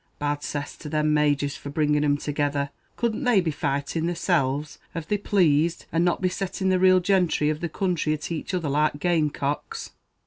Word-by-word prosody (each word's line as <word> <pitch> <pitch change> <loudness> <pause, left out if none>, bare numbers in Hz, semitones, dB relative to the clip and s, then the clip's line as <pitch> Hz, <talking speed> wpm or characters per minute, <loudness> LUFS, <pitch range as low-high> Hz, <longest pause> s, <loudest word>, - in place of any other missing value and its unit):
Bad 145 0 -1
cess 145 -1 -4
to 150 - -8
them 150 0 +1
Majors 145 -1 +2
for 145 - -8
bringing 150 0 +1
thim 145 -1 +2
together; 145 -1 -1 0.3
couldn't 235 +2 -1
they 245 -5 +4
be 170 -3 0
fighting 145 +3 -2
theyselles 150 -5 0 0.2
av 165 -2 -4
they 210 - +1
plazed, 170 -5 +2
and 165 +1 +2
not 175 +1 +1
be - - +4
setting 190 +1 -2
the 185 -1 +3
real 185 0 +6
gentry 180 -5 +2
of 155 - -4
the 170 - -3
counthry 170 -3 0
at 150 +3 -7
each 170 +3 -3
other 170 -4 -1
like 150 +1 +1
game 165 -3 +2
cocks?" 145 0 -4
155 Hz, 195 wpm, -25 LUFS, 145-180 Hz, 0.3 s, real